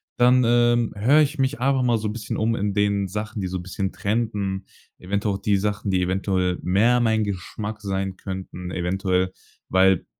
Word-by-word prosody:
dann, 125 +1 +5
ähm, 120 0 +3
höre 125 +9 +4
ich 150 0 0
mich 135 0 0
einfach 135 0 +2
mal 120 -2 +3
so 110 - -3
'n 105 - -3
bisschen 115 -1 -4 0.2
in 100 -2 -1
den 100 -1 +1
Sachen, 105 +2 -4
die 95 - -2
so 95 - -3
'n 90 - -6
bisschen 95 +1 -3
trenden. 100 -3 -2 0.3
Eventuell 100 +2 -1
auch 100 - -7
die 100 -2 +2
Sachen, 105 0 -2
die 95 -1 +2
eventuell 90 -1 0
mehr 115 +7 +3
mein 110 -2 +2
Geschmack 105 +2 -5
sein 95 -1 -2
könnten 95 -2 -7
eventuell. 95 +1 0 0.3
Weil 95 -1 +3
100 Hz, 180 wpm, -23 LUFS, 95-115 Hz, 0.3 s, dann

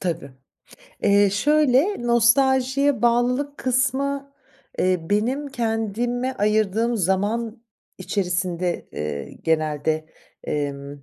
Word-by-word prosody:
Tabii. 165 -6 -3 0.7
Eee, 200 0 +4
şöyle, 290 - +2
nostaljiye 265 +2 +3
bağlılık 250 +4 +1
kısmı, 270 +2 -1 0.5
eee, 185 -1 +2
benim 255 +8 0
kendime 240 +1 -2
ayırdığım 215 +1 +1
zaman 215 +5 -1 0.4
içerisinde, 180 -2 -2
eee, 75 -1 -5
genelde, 155 -1 0 0.4
emm, 140 -1 -4
225 Hz, 80 wpm, -23 LUFS, 180-255 Hz, 0.7 s, Eee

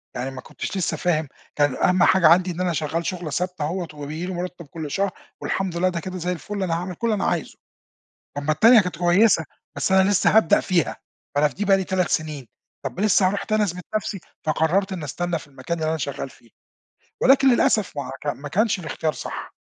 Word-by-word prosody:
يعني 125 +2 -3
ما 130 - -8
كٌنتش - - -6
لسّه 165 -3 -1
فاهم، 160 -2 0 0.3
كان 145 -3 +2
أهم 180 -1 +3
حاجة 185 -4 +5
عندي 180 +3 +5
إن 175 +1 -4
أنا 180 -2 0
شغّال 160 +3 -2
شُغلة 180 -4 -3
ثابتة 180 0 -2
أهوة 175 +3 -3
وبييجي 150 +3 -5
لي 185 - -4
مُرتّب 180 -1 -5
كل 150 0 -7
شهر، 195 +3 0 0.3
والحمد 190 -3 -2
لله 185 +2 +2
ده 175 -2 -3
كده 185 +2 -6
زي 180 0 -2
الفل 195 +3 -4
أنا 175 -3 -1
هاعمل 180 +2 -4
كل 235 - -2
اللي - - +2
أنا 195 - -1
عايزه، - - -2 0.8
أمّا 145 +2 0
التانية 225 +8 +7
كانت 180 -5 -4
كويّسة، 175 0 +4 0.3
بس - - 0
أنا 190 +1 +5
لسّه 205 +2 +3
هابدأ 220 -7 +5
فيها، 175 -5 0 0.4
فأنا 150 +1 +4
في - - -14
دي 205 - -2
بقى 195 -1 +5
لي 190 - -1
3 185 -2 0
سنين، 150 -5 -2 0.4
طَب - - -4
لسّه 205 -2 +4
هاروح 200 +1 -2
تاني 215 -1 +1
أثبت 180 -2 -5
نفْسي، 215 -1 -3 0.3
فقررت 170 +5 +1
إنّي 170 -5 -4
أستنى 175 +4 -2
في - - -13
المكان 140 +5 -5
اللي 155 -1 -1
أنا 160 - -1
شغّال 140 -2 -4
فيه، 120 -2 -21 0.7
ولكن 270 +1 +5
للأسف 215 - +2
ما 140 -2 -3
هو - - -6
ك - - -5
ما 145 0 -4
كانش 210 +4 +1
الاختيار 160 -2 -2
صح. - - -7
175 Hz, 220 wpm, -23 LUFS, 155-190 Hz, 0.8 s, التانية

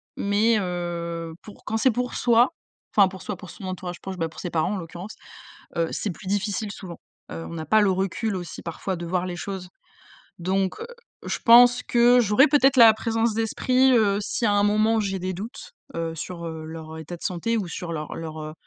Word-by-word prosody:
mais 210 +3 +2
heu, 170 -2 -4
pour 210 - -14
quand 220 - -1
c'est 260 - +4
pour 250 +2 -2
soi, 240 +3 +4 0.4
enfin 200 -2 +7
pour 190 -1 -9
soi, 210 - -4
pour 180 0 -12
son - - -12
entourage 185 -1 -5
proche, 190 -1 -6
bah, 165 -2 -1
pour 160 - -13
ses 180 - -5
parents 160 +4 0
en - - -3
l'occurrence, 175 +4 -8 0.6
heu, 165 -1 +2
c'est 205 - -2
plus 175 +3 -11
difficile 205 +2 -1
souvent, 175 -4 -9 0.3
heu, 165 - -6
on 170 - -6
a 160 - -5
pas 215 +8 +4
le 205 -2 +4
recul 195 +3 -1
aussi 175 -2 -6
parfois 175 +2 -4
de 170 - -6
voir 180 +1 -1
les 180 -1 -5
choses. 190 -1 -6 0.7
Donc 190 - -1
heu, 460 - -5 0.4
je - - -2
pense 245 +1 +7
que 245 +1 +5
j'aurais 220 +5 +5
peut-être 275 -2 +4
la 230 -3 +9
présence 225 0 0
d'esprit, 255 +4 +2
heu, 210 -4 +3
si 230 +3 -1
à 205 - +3
un 205 0 +3
moment 215 +2 +3
où - - +2
j'ai 195 -2 -2
des 185 +1 -3
doutes, 225 - -8 0.2
heu, 165 -1 -2
sur 170 +1 -6
leur 160 0 -8
état 160 +2 -7
de - - -18
santé 185 +6 -1
ou 205 -4 -1
sur 170 0 -6
leur 155 -2 -5
leur, 160 -1 -6
heu, 155 0 -6
195 Hz, 215 wpm, -24 LUFS, 170-225 Hz, 0.7 s, la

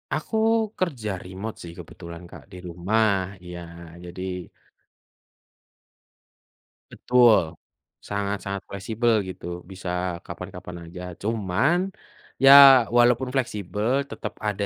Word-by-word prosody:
Aku 220 - -3 0.4
kerja 130 - -2
remote 95 +4 -7
sih, 85 -1 -9
kebetulan 85 +1 -10
Kak, - - -12
di 90 - -10
rumah, 100 +6 +1 0.3
iya, 90 0 -8 0.5
jadi 90 0 -6 2.4
Betul, 115 -10 +3 0.4
sangat-sangat 100 -1 -4
fleksibel 110 +3 0
gitu, 95 - -9 0.3
bisa 95 -1 -7 0.4
kapan-kapan 90 -1 -9
aja. 90 +2 -9 0.2
Cuman, 115 - 0 0.5
ya 135 - +9 0.5
walaupun 120 +1 +4
fleksibel, 120 +2 -1
tetap 110 - -7
ada 105 -1 -2
100 Hz, 95 wpm, -24 LUFS, 90-115 Hz, 2.4 s, ya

